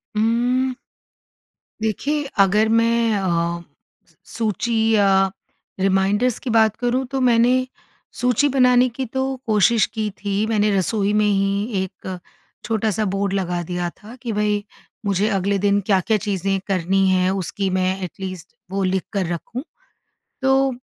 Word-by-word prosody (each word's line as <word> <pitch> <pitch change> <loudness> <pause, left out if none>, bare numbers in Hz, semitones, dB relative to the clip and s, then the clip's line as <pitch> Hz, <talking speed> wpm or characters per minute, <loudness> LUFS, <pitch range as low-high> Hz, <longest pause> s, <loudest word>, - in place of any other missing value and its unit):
हुँ। 245 +4 +1 1.1
देखिए, 280 +8 -1 0.2
अगर 210 +3 +4
मैं 230 0 +2
अ, 170 -2 -1 0.5
सू - - -29 0.2
सूची 230 +1 -1 0.2
या 195 -2 +3 0.5
रिमाइंडर्स 195 +5 +2
की 260 - -5
बात 220 -2 +3
करूँ 245 +3 -1
तो 270 - -1
मैंने, 250 +1 +3 0.4
सूची 250 +3 +1
बनाने 250 -2 +4
की 260 +3 -4
तो 265 +3 -2 0.2
कोशिश 215 +1 +4
की 215 -1 -3
थी, 205 +1 0
मैंने 215 -1 +2
रसोई 200 +2 0
में 210 0 +3
ही 200 0 0
एक 185 0 -7 0.5
छोटा-सा 215 -1 0
बोर्ड 195 0 -1
लगा 180 -3 -1
दिया 175 0 -3
था 215 +4 -11
कि 235 - -3
भई 210 0 0 0.4
मुझे 200 +1 +1
अगले 200 -1 0
दिन 200 0 +3
क्या-क्या 200 +2 +2
चीज़ें 195 -2 -1
करनी 195 0 +1
हैं 185 0 +2
उसकी 195 +1 -2
मैं 185 0 0
एटलीस्ट 185 -1 -7 0.2
वो 195 0 -1
लिख 185 0 0
कर 195 -2 0
रखूँ। 235 +9 -6 0.8
तो, 265 0 +3
205 Hz, 140 wpm, -21 LUFS, 190-230 Hz, 1.1 s, अगर